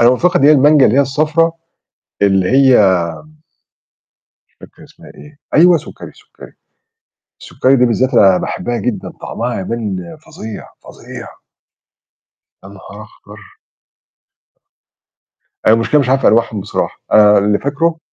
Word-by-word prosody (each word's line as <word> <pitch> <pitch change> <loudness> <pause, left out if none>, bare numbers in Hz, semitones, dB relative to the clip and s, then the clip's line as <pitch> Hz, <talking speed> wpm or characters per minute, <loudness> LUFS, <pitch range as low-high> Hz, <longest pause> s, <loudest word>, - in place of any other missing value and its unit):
أنا 120 +1 +5
مفتقد 175 +8 0
اللي 140 -3 +3
هي 155 - +6
المانجا 145 0 +4
اللي 115 - 0
هي - - +5
الصفرا، 155 +4 0 0.7
اللي 95 -1 +1
هي 125 -9 +4 1.6
مش - - -13
فاكر - - -19
اسمها - - -18
إيه. 150 0 -16 0.2
أيوه، 175 +3 +5
سُكّري، 155 - -10
سُكّري. - - -17 0.9
السُكّري 130 +1 0
دي 125 -1 +2
بالذات 125 +2 -1
أنا 95 -2 +4
باحبّها 120 +5 -4
جدًا، 125 -2 -4
طعمها 120 -2 -5
يبان 95 -4 -6
فظيع، 110 -1 -10 0.2
فظيع. - - -12 1.4
يا - - -11
نهار 100 +1 -13
أخبَر! 105 0 -17 2.3
أنا 110 - +5
المشكلة 115 +6 +1
مش 135 - -3
عارف 135 +1 +1
أنواعهم 110 -2 +1
بصراحة، - - -5
أنا 105 -1 +5
اللي 105 +1 0
فاكرُه 160 +4 -2
120 Hz, 130 wpm, -14 LUFS, 105-145 Hz, 2.3 s, هي